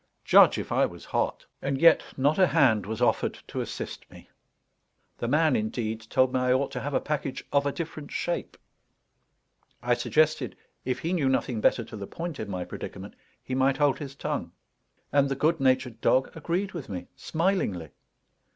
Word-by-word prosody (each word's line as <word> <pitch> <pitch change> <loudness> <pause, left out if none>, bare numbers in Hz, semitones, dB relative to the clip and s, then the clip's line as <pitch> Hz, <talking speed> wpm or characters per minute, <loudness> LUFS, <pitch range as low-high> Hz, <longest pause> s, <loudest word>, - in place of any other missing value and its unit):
Judge - - +7
if - - -5
I - - +3
was - - -12
hot! - - -1 0.2
And 135 0 -1
yet 165 0 +7 0.2
not 145 +6 +2
a 185 - +6
hand 120 - +3
was 110 +3 -2
offered - - +1
to - - -4
assist - - -6
me. - - -15 0.9
The 120 - -2
man, 150 +1 +3
indeed, 110 0 -2
told 130 0 +3
me 130 - +2
I 125 0 +2
ought 135 +1 0
to 130 - -4
have 140 +2 -3
a - - +4
package 145 -3 -3
of 140 0 +3
a - - +1
different 155 -2 -6
shape. 175 - -3 1.3
I 120 0 +3
suggested, 125 - +1 0.3
if 130 - -1
he 170 +3 -1
knew 145 -7 +2
nothing 125 -3 0
better 115 - +3
to 110 - -10
the 100 -2 -6
point 165 -4 -6
in 110 - -5
my 90 -2 -3
predicament, - - -8 0.3
he 130 - -5
might 135 +1 +2
hold 145 -2 +2
his 140 -2 -7
tongue. - - -3 0.6
And 140 0 +3
the 135 - -1
good 160 +4 +1
natured 130 -3 +1
dog 130 +1 +2
agreed 175 +5 -2
with 165 -7 -7
me 90 -3 -5
smilingly. 160 - -1
135 Hz, 185 wpm, -27 LUFS, 120-155 Hz, 1.3 s, Judge